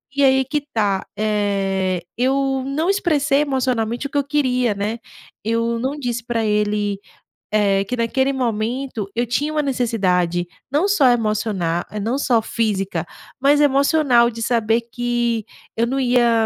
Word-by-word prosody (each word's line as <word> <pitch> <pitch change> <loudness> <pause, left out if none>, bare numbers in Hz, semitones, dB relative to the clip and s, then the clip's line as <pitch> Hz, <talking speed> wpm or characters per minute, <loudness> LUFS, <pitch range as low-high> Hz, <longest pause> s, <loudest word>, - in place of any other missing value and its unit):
E 280 - +2
aí 265 -1 +4
que 295 +3 -1
tá, 200 -4 0
eh, 195 -3 0 0.2
eu 270 +1 +1
não 305 +6 -1
expressei 305 -8 +2
emocionalmente 255 -3 -1
o - - -21
que 285 - -3
eu 285 - +2
queria, 255 -5 +1
né? 210 +3 -3 0.4
Eu 230 +1 0
não 270 +5 -2
disse 240 -3 -3
pra 230 -2 -1
ele, 210 -1 0 0.5
eh, 200 -2 +2
que 250 +5 -3
naquele 265 +4 +1
momento 235 -2 -2
eu 240 +1 +1
tinha 290 +6 -1
uma 305 -1 +1
necessidade, 185 -10 0 0.2
não 300 +8 +2
só 345 -10 +4
emociona 210 -7 0 0.2
não 240 +6 -1
só 240 -5 +2
física, 195 -7 -1 0.3
mas 285 +2 +4
emocional 275 -3 +4
de 230 0 -7
saber 230 -1 +2
que 240 -2 -1 0.3
eu 230 +1 +2
não 270 +3 -1
ia 245 -2 +3
235 Hz, 150 wpm, -20 LUFS, 210-270 Hz, 0.5 s, aí